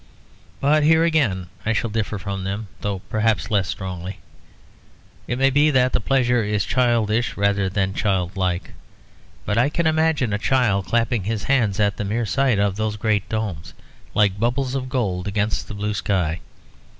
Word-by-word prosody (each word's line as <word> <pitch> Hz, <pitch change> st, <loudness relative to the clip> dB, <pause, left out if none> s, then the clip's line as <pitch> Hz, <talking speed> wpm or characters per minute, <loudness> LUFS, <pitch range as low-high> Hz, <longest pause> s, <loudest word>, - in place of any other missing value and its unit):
But 150 Hz, +2 st, +3 dB
here 160 Hz, +2 st, +4 dB
again 135 Hz, -, +1 dB, 0.2 s
I 115 Hz, -, +1 dB
shall 115 Hz, 0 st, -1 dB
differ 105 Hz, -1 st, -2 dB
from 100 Hz, -1 st, -4 dB
them, 100 Hz, +2 st, -4 dB
though 100 Hz, -2 st, -3 dB
perhaps 110 Hz, -1 st, 0 dB
less 100 Hz, -4 st, +2 dB
strongly. 90 Hz, 0 st, -5 dB, 1.1 s
It 120 Hz, -, -2 dB
may 135 Hz, +1 st, +3 dB
be 145 Hz, +3 st, +4 dB
that 130 Hz, -3 st, +2 dB
the -, -, +2 dB
pleasure 125 Hz, -3 st, +2 dB
is 105 Hz, -3 st, 0 dB
childish 120 Hz, -2 st, +1 dB
rather 100 Hz, -1 st, +1 dB
than 95 Hz, 0 st, -1 dB
childlike; 95 Hz, -2 st, -1 dB, 0.7 s
but 105 Hz, +2 st, +1 dB
I 130 Hz, +4 st, +3 dB
can 170 Hz, +2 st, -1 dB
imagine 160 Hz, -7 st, +2 dB
a 105 Hz, -, 0 dB
child 110 Hz, -7 st, +1 dB
clapping 115 Hz, -3 st, 0 dB
his 110 Hz, -1 st, -2 dB
hands 115 Hz, -7 st, +1 dB
at 105 Hz, -1 st, +1 dB
the 110 Hz, -, -2 dB
mere 110 Hz, +4 st, -1 dB
sight 130 Hz, -1 st, +1 dB
of 100 Hz, -1 st, +1 dB
those 110 Hz, -1 st, -1 dB
great 105 Hz, -2 st, 0 dB
domes 105 Hz, -7 st, -4 dB, 0.4 s
like 100 Hz, -2 st, +2 dB
bubbles 125 Hz, +3 st, 0 dB
of 130 Hz, -1 st, -3 dB
gold 100 Hz, -8 st, -1 dB
against 105 Hz, +1 st, -1 dB
the 105 Hz, -, -7 dB
blue 105 Hz, +1 st, -2 dB
sky. 90 Hz, -5 st, -1 dB
105 Hz, 170 wpm, -22 LUFS, 100-125 Hz, 1.1 s, here